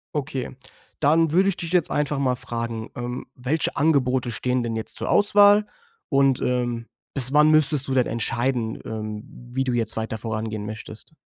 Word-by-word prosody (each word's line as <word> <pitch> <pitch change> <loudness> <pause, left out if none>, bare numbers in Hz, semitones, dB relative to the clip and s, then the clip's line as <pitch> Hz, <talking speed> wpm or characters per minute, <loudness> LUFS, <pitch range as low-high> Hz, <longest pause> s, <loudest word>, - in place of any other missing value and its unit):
Okay, 135 -3 -3 0.4
dann 160 +2 +3
würde 190 +4 +4
ich 190 - -2
dich 170 -1 -5
jetzt 175 -3 +2
einfach 150 -1 0
mal 130 -2 +1
fragen, 115 -2 -5
ähm. 120 +1 -5
Welche 135 +6 -1
Angebote 130 -5 +1
stehen 125 +2 -1
denn 115 -1 -3
jetzt 110 - -5
zur - - -3
Auswahl? 205 0 +5 0.4
Und, 135 -3 +3
ähm, 120 -2 -1 0.3
bis 135 -1 +4
wann 150 +1 +6
müsstest 150 -3 +4
du 135 - -1
denn 125 -2 +3
entscheiden, 120 0 -2
ähm, 110 -1 -5 0.3
wie 135 +2 0
du 130 -2 -1
jetzt 115 -2 -2
weiter 110 0 -3
vorangehen 110 -1 -4
möchtest? 110 +5 -9
125 Hz, 170 wpm, -23 LUFS, 115-150 Hz, 0.4 s, wann